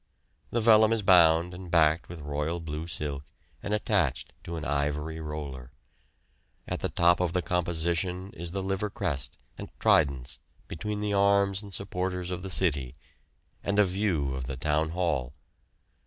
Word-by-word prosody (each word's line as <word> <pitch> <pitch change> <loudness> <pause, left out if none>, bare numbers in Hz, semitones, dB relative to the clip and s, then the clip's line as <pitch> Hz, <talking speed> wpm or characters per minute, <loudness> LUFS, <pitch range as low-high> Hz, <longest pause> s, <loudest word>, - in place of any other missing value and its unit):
The 120 - 0
vellum 110 -1 +6
is 110 -2 0
bound 85 -2 +5
and 90 0 -9
backed 80 -1 +3
with 85 -2 -8
royal 75 +3 -2
blue 80 0 -5
silk 75 -4 -4 0.4
and 100 - -4
attached 105 0 0
to 85 - -5
an 80 -2 -5
ivory 75 +2 -1
roller. 70 -5 -6 0.9
At - - -3
the - - -1
top 85 0 +4
of 90 -2 0
the 90 -2 0
composition 90 +2 -1
is 85 +1 -4
the 95 +2 -3
Liver 95 +2 -1
crest 85 -9 -4 0.2
and - - -6
tridents 65 -4 +2 0.3
between 105 +5 -4
the 105 -1 -1
arms 100 -1 +3
and 100 -2 -11
supporters 90 0 -3
of 90 -1 -3
the 95 - -6
city, 70 -9 0 0.7
and 100 - -1
a 105 - +6
view 90 -8 0
of 65 -1 -4
the 65 0 -5
Town 75 +3 +1
Hall. 80 -7 -1
85 Hz, 160 wpm, -28 LUFS, 75-95 Hz, 0.9 s, vellum